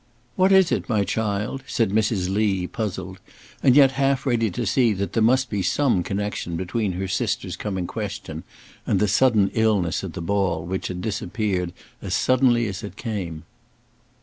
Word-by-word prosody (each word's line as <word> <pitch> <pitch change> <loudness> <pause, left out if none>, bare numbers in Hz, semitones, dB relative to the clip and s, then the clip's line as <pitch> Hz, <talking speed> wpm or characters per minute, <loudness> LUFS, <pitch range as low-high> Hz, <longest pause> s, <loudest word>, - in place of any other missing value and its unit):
"What 190 +1 +3
is 190 -2 +5
it, - - -1
my 105 -3 +2
child?" 105 +5 -2
said 115 -5 0
Mrs. 105 -3 +1
Lee, 95 -2 +1
puzzled, 95 -3 -5 0.4
and 130 -2 +5
yet 140 -2 +7
half 135 0 0
ready 115 -4 +1
to 90 - -3
see 120 -5 +3
that 100 0 -3
there 115 - +1
must 130 +4 +3
be 105 -4 -2
some 125 -2 +2
connection 100 -2 -3
between 95 +3 -2
her 95 +2 -3
sister's 95 - -2
coming 95 -4 -3
question 100 -6 -5 0.5
and 95 - +2
the 105 - +2
sudden 105 -1 +3
illness 105 -7 +1
at 90 -4 -5
the - - -6
ball, 95 -2 0
which 95 +2 -3
had 90 -1 -5
disappeared 95 -3 -2 0.3
as - - -2
suddenly 125 -2 +3
as 95 -3 -4
it 105 - -7
came. 95 -9 -5
105 Hz, 175 wpm, -23 LUFS, 95-115 Hz, 0.5 s, yet